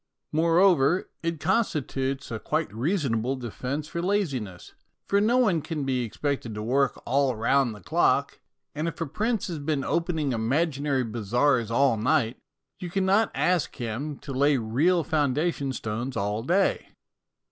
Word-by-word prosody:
Moreover, 170 Hz, 0 st, +3 dB
it 165 Hz, -2 st, -2 dB
constitutes 140 Hz, -, -1 dB
a 110 Hz, -, -3 dB
quite 155 Hz, -6 st, -2 dB
reason 135 Hz, -, 0 dB
able 125 Hz, +5 st, -1 dB
defence 130 Hz, +4 st, -4 dB
for 170 Hz, +2 st, -4 dB
laziness, 140 Hz, -, -2 dB, 0.3 s
for 200 Hz, 0 st, +2 dB
no 235 Hz, +4 st, +3 dB
one 200 Hz, -11 st, +3 dB
can 155 Hz, -1 st, -4 dB
be 130 Hz, -2 st, 0 dB
expected 120 Hz, -1 st, -3 dB
to 105 Hz, -, -4 dB
work 135 Hz, +4 st, +1 dB
all 135 Hz, 0 st, +2 dB
round 120 Hz, +1 st, +2 dB
the 105 Hz, -, -13 dB
clock, -, -, +1 dB, 0.3 s
and 155 Hz, +2 st, -2 dB
if 165 Hz, -, -5 dB
a 165 Hz, -, -1 dB
prince 215 Hz, -, -1 dB
has 170 Hz, -4 st, -4 dB
been 145 Hz, -1 st, -1 dB
opening 160 Hz, -2 st, 0 dB
imaginary 140 Hz, +3 st, 0 dB
bazaars 120 Hz, +2 st, +1 dB
all 120 Hz, 0 st, +3 dB
night, 120 Hz, +1 st, +1 dB, 0.4 s
you 180 Hz, -, -5 dB
cannot 195 Hz, +4 st, +2 dB
ask 180 Hz, -3 st, +1 dB
him 130 Hz, +5 st, -4 dB
to 140 Hz, -, -8 dB
lay 140 Hz, +2 st, +3 dB
real 145 Hz, +10 st, +2 dB
foundation 150 Hz, -1 st, 0 dB
stones 120 Hz, +1 st, -4 dB
all 105 Hz, +1 st, -1 dB
day. 180 Hz, +10 st, +1 dB
140 Hz, 150 wpm, -26 LUFS, 120-165 Hz, 0.4 s, Moreover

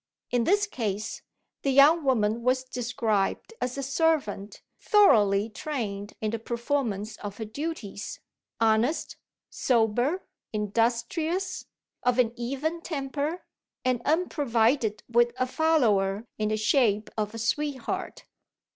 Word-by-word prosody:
In 245 Hz, -2 st, +2 dB
this 410 Hz, +2 st, +3 dB
case, 215 Hz, -, -3 dB, 0.4 s
the 275 Hz, -, 0 dB
young 290 Hz, +5 st, +6 dB
woman 230 Hz, -4 st, +2 dB
was 255 Hz, +2 st, +2 dB
described 240 Hz, -, -1 dB
as 250 Hz, +1 st, -2 dB
a 275 Hz, -, -2 dB
servant 270 Hz, -8 st, 0 dB, 0.2 s
thoroughly 215 Hz, -, +5 dB
trained 215 Hz, -5 st, -4 dB
in 215 Hz, -1 st, 0 dB
the 230 Hz, -, -3 dB
performance 230 Hz, -3 st, -2 dB
of 205 Hz, -1 st, -7 dB
her 220 Hz, -, -4 dB
duties, 225 Hz, -4 st, -5 dB, 0.4 s
honest, 225 Hz, +7 st, +1 dB, 0.3 s
sober, 245 Hz, -, +1 dB, 0.3 s
industrious, 235 Hz, -, -1 dB, 0.4 s
of 250 Hz, 0 st, +1 dB
an 240 Hz, -2 st, +3 dB
even 275 Hz, +7 st, -3 dB
temper, 295 Hz, +1 st, -3 dB, 0.4 s
and 250 Hz, -2 st, +1 dB
unprovided 245 Hz, -, +1 dB
with 240 Hz, 0 st, +3 dB
a 255 Hz, -, +1 dB
"follower" 235 Hz, -9 st, +2 dB
in 215 Hz, 0 st, +1 dB
the 215 Hz, -, 0 dB
shape 215 Hz, -1 st, +2 dB
of 215 Hz, 0 st, -2 dB
a -, -, -4 dB
sweetheart. 265 Hz, +3 st, -2 dB
240 Hz, 120 wpm, -27 LUFS, 215-285 Hz, 0.4 s, young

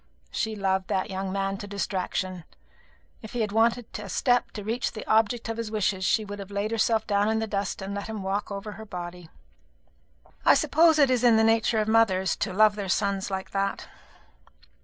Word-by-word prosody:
She 220 Hz, -1 st, -2 dB
loved 190 Hz, -2 st, 0 dB
that 190 Hz, +2 st, -1 dB
young 190 Hz, 0 st, -3 dB
man 195 Hz, 0 st, -1 dB
to 205 Hz, -, -7 dB
distraction. 185 Hz, -2 st, -3 dB, 0.8 s
If 220 Hz, -, -10 dB
he 240 Hz, -, -1 dB
had 210 Hz, -2 st, -1 dB
wanted 230 Hz, +2 st, +2 dB
a 205 Hz, -1 st, -8 dB
step 245 Hz, +4 st, +2 dB
to 210 Hz, -, -6 dB
reach 230 Hz, +4 st, -2 dB
the 215 Hz, -, -7 dB
object 225 Hz, +2 st, +2 dB
of 225 Hz, 0 st, -3 dB
his 230 Hz, -2 st, -3 dB
wishes, 205 Hz, -3 st, 0 dB
she 215 Hz, +3 st, +2 dB
would 205 Hz, 0 st, -7 dB
have 200 Hz, -1 st, -8 dB
laid 205 Hz, +2 st, -2 dB
herself 225 Hz, -1 st, +1 dB
down 205 Hz, 0 st, +1 dB
in 220 Hz, -, +1 dB
the 220 Hz, -, 0 dB
dust 200 Hz, -2 st, -3 dB
and 195 Hz, +1 st, -5 dB
let 200 Hz, 0 st, -4 dB
him 220 Hz, -3 st, -5 dB
walk 195 Hz, +2 st, -2 dB
over 200 Hz, +1 st, -5 dB
her 220 Hz, +1 st, -9 dB
body. 175 Hz, -3 st, -8 dB, 1.1 s
I -, -, +6 dB
suppose 320 Hz, 0 st, +4 dB
it 280 Hz, -3 st, +5 dB
is 250 Hz, -1 st, +1 dB
in 235 Hz, -2 st, +6 dB
the 220 Hz, -, +4 dB
nature 225 Hz, 0 st, +3 dB
of 215 Hz, -1 st, +1 dB
mothers 195 Hz, -5 st, +3 dB
to 195 Hz, -, -2 dB
love 210 Hz, +2 st, +4 dB
their 200 Hz, -2 st, -4 dB
sons 200 Hz, 0 st, 0 dB
like 190 Hz, -1 st, -4 dB
that. 195 Hz, 0 st, -2 dB
205 Hz, 205 wpm, -26 LUFS, 195-220 Hz, 1.1 s, I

